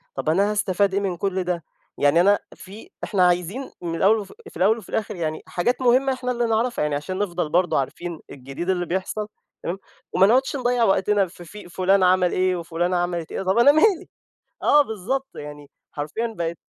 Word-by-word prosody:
طَب، 135 Hz, +3 st, -2 dB
أنا 200 Hz, +6 st, +2 dB
هاستفيد 200 Hz, -1 st, +1 dB
إيه 200 Hz, -, +2 dB
من 190 Hz, -3 st, -2 dB
كل 190 Hz, 0 st, -1 dB
ده؟ 175 Hz, -2 st, -2 dB, 0.3 s
يعني 145 Hz, +4 st, +4 dB
أنا 200 Hz, +3 st, +4 dB, 0.2 s
في 200 Hz, +4 st, -12 dB
إحنا 185 Hz, -4 st, +3 dB
عايزين 180 Hz, +9 st, -1 dB
من 170 Hz, -1 st, -3 dB
الأول 200 Hz, +6 st, +4 dB
وف 200 Hz, -3 st, -7 dB, 0.2 s
في -, -, -12 dB
الأول 210 Hz, +5 st, +3 dB
وفي 220 Hz, -, -12 dB
الآخر 215 Hz, -, -2 dB
يعني، 155 Hz, -3 st, -3 dB
حاجات 245 Hz, +8 st, -1 dB
مهمة 260 Hz, +2 st, +3 dB
إحنا 250 Hz, -1 st, -3 dB
اللي 240 Hz, -1 st, 0 dB
نعرفها، 230 Hz, -2 st, 0 dB
يعني 150 Hz, -1 st, 0 dB
عشان 185 Hz, +6 st, -4 dB
نفضل 175 Hz, -5 st, -2 dB
برضه 175 Hz, 0 st, +2 dB
عارفين 170 Hz, +4 st, -5 dB
الجديد 135 Hz, +7 st, -7 dB
اللي 180 Hz, -2 st, +1 dB
بيحصل، 190 Hz, +4 st, -3 dB, 0.4 s
تمام، 175 Hz, +3 st, -3 dB, 0.4 s
وما 190 Hz, +1 st, +5 dB
نقعدش 260 Hz, +6 st, +2 dB
نضيِّع 245 Hz, -2 st, +1 dB
وقتنا 195 Hz, -1 st, +2 dB
في 175 Hz, 0 st, -13 dB
في 190 Hz, +1 st, -11 dB
فلان 190 Hz, +2 st, +2 dB
عمل 180 Hz, 0 st, +4 dB
إيه 185 Hz, 0 st, +1 dB
وفلانة 175 Hz, +1 st, -1 dB
عملت 175 Hz, -2 st, -2 dB
إيه. -, -, -3 dB
طَب، 190 Hz, +2 st, +1 dB
أنا 235 Hz, +4 st, +7 dB
مالي؟ 355 Hz, +4 st, +2 dB, 0.5 s
آه، 295 Hz, -, +6 dB
بالضبط، 260 Hz, +3 st, -3 dB
يعني 145 Hz, -1 st, -9 dB, 0.2 s
حرفيًا 220 Hz, +11 st, -4 dB
بقت 170 Hz, 0 st, -2 dB
185 Hz, 195 wpm, -23 LUFS, 175-220 Hz, 0.5 s, أنا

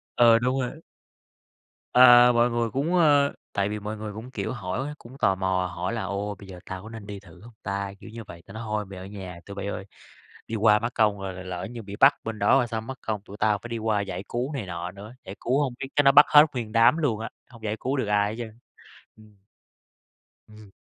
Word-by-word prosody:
Ờ, 115 Hz, -1 st, +6 dB
đúng 125 Hz, +2 st, 0 dB
rồi. 145 Hz, +6 st, -5 dB, 1.1 s
À, 125 Hz, -1 st, +8 dB
mọi 120 Hz, 0 st, +3 dB
người 120 Hz, -1 st, -1 dB
cũng, 140 Hz, -, -1 dB
ơ 145 Hz, -4 st, +4 dB, 0.2 s
tại 100 Hz, 0 st, 0 dB
vì 105 Hz, 0 st, -4 dB
mọi 105 Hz, +1 st, -5 dB
người 105 Hz, -1 st, -6 dB
cũng, 115 Hz, +5 st, -9 dB
kiểu, 130 Hz, -, -3 dB
hỏi, 120 Hz, +6 st, -4 dB
cũng 125 Hz, +3 st, -14 dB
tò 95 Hz, -7 st, +2 dB
mò 95 Hz, -1 st, 0 dB
hỏi 90 Hz, +5 st, -3 dB
là 115 Hz, -, -3 dB
"Ồ, 100 Hz, +1 st, -3 dB
bây 100 Hz, -, -12 dB
giờ 90 Hz, -2 st, -10 dB
tao 95 Hz, +1 st, -7 dB
có 110 Hz, -, -10 dB
nên 110 Hz, -2 st, -9 dB
đi 100 Hz, -1 st, -7 dB
thử 90 Hz, -3 st, -17 dB
hông 120 Hz, +2 st, -14 dB
ta?", 100 Hz, 0 st, -3 dB
kiểu -, -, -11 dB
như 115 Hz, +1 st, -8 dB
vậy, 85 Hz, -4 st, -12 dB
ta 95 Hz, -, -13 dB
nói: 110 Hz, +1 st, -6 dB
"Thôi, 105 Hz, -1 st, -2 dB
mày 95 Hz, -1 st, -10 dB
ở 95 Hz, -, -8 dB
nhà 95 Hz, -3 st, -8 dB
tụi 100 Hz, -, -9 dB
bây 100 Hz, 0 st, -5 dB
ơi! 100 Hz, -, -5 dB, 0.6 s
Đi 115 Hz, -, -4 dB
qua 105 Hz, -1 st, +4 dB
mất 115 Hz, +2 st, -3 dB
công 105 Hz, -3 st, +2 dB
rồi 95 Hz, -1 st, -5 dB
rồi 90 Hz, -, -8 dB
lỡ 90 Hz, -1 st, -5 dB
như 120 Hz, -2 st, -8 dB
bị 100 Hz, 0 st, -8 dB
bắt -, -, +6 dB
bên 110 Hz, -1 st, -5 dB
đó 100 Hz, -, +1 dB
rồi 125 Hz, -3 st, +1 dB
sao? 115 Hz, -1 st, -3 dB
Mắc 130 Hz, +4 st, -8 dB
công 105 Hz, -2 st, -3 dB
tụi 100 Hz, 0 st, -12 dB
tao 105 Hz, -1 st, +2 dB
phải 120 Hz, -, -7 dB
đi 115 Hz, -, -3 dB
qua 110 Hz, -2 st, 0 dB
giải 100 Hz, -1 st, -5 dB
cứu 125 Hz, +5 st, -3 dB
này 130 Hz, -8 st, -4 dB
nọ 85 Hz, 0 st, -5 dB
nữa. 100 Hz, +4 st, -11 dB
Giải 95 Hz, -, -8 dB
cứu 130 Hz, +4 st, +1 dB
hông 135 Hz, -4 st, -1 dB
biết 135 Hz, -, -4 dB
chắc 145 Hz, -, +4 dB
nó 135 Hz, -, +7 dB
bắt 145 Hz, +2 st, +8 dB
hết 150 Hz, 0 st, +8 dB
nguyên 115 Hz, -4 st, -4 dB
đám 115 Hz, +7 st, +5 dB
luôn 130 Hz, -10 st, 0 dB
á, 115 Hz, -, -5 dB, 0.2 s
hông 115 Hz, -2 st, -15 dB
giải 110 Hz, 0 st, -2 dB
cứu 135 Hz, +2 st, -2 dB
được 130 Hz, -, 0 dB
ai 105 Hz, 0 st, +2 dB
hết -, -, -6 dB
trơn." 115 Hz, -1 st, -8 dB, 0.6 s
Ừm. 110 Hz, -1 st, -19 dB, 1.1 s
Ừm. 105 Hz, -2 st, -15 dB
110 Hz, 255 wpm, -25 LUFS, 100-120 Hz, 1.1 s, À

